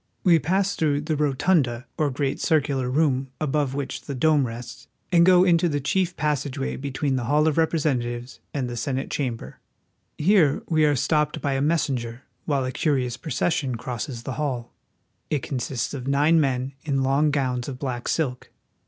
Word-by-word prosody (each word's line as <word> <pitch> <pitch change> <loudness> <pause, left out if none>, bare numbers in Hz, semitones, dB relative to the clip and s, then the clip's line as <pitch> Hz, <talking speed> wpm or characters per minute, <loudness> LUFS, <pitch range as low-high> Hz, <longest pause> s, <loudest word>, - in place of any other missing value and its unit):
We 170 -4 +5
pass 190 +6 0
through 145 -2 +1
the 155 +1 -1
rotunda, 140 -3 +1
or 150 -2 +1
great 135 0 -2
circular 140 -5 +1
room 135 -1 +1
above 145 -2 0
which 140 -2 -4
the 140 - -6
dome 145 0 +3
rests, 120 +3 -9 0.2
and 170 -1 +6
go 180 0 +6
on 185 - +4
into 170 0 +3
the 145 -2 0
chief 180 +5 0
pas 150 -2 0
sageway 135 -1 -4
between 140 0 -1
the 120 - -2
hall 150 +5 +3
of 155 - +2
Representatives 125 -7 -1
and 135 -4 -2
the 120 - -5
Senate 135 +2 -3
chamber. 125 -5 -4 0.6
Here 165 -4 +3
we 155 -2 +3
are 145 -1 +3
stopped 150 +3 +1
by 140 -2 -1
a 135 - 0
messenger 130 -6 -1 0.2
while 140 -3 0
a 130 - -2
curious 130 -5 0
procession 140 -3 -1
crosses 120 0 -5
the 130 - -4
hall. 125 -5 -3 0.6
It 150 -3 -1
consists 130 -2 -3
of 130 -2 -5
nine 150 +4 +4
men 130 -1 -1
in 135 -3 0
long 140 +3 +3
gowns 130 -4 -1
of 135 -3 -5
black 125 -3 -4
silk. 130 -6 -1
140 Hz, 180 wpm, -24 LUFS, 130-155 Hz, 0.6 s, and